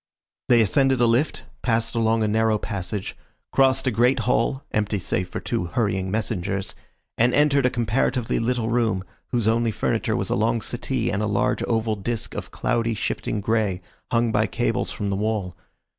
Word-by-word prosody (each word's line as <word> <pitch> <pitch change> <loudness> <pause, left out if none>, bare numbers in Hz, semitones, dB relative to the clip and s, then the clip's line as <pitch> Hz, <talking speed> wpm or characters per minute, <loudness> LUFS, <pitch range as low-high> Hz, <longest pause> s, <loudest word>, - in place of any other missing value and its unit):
They 120 -1 +6
ascended 135 +4 +3
a 120 - +5
lift, 120 +6 +1 0.2
passed 115 -1 0
along 115 -1 +2
a - - +2
narrow 110 0 +2
passage, 100 -1 -4 0.4
crossed 135 0 +3
a 130 - +2
great 120 +3 +3
hall, 125 +3 +1
empty 105 -1 0
save 90 -1 -2
for - - -4
two 115 -6 -2
hurrying 95 -1 -1
messengers, 100 -2 -2 0.5
and 120 +2 +4
entered 140 -3 +4
a - - +2
comparatively 120 +1 0
little 115 -1 0
room, 115 -5 +1 0.2
whose 120 -4 0
only 115 +1 +2
furniture 110 - 0
was - - -2
a - - +2
long 115 +2 +1
settee 120 0 -2
and 100 +1 -1
a 105 - 0
large 100 -1 +1
oval 110 -1 0
disc 110 +3 -4
of - - -5
cloudy, 115 -1 0
shifting 105 0 -2
grey, 105 -3 0 0.3
hung 115 -1 +2
by 105 0 +2
cables - - -1
from 100 -1 -3
the - - 0
wall. 105 -3 -2
115 Hz, 175 wpm, -24 LUFS, 105-120 Hz, 0.5 s, They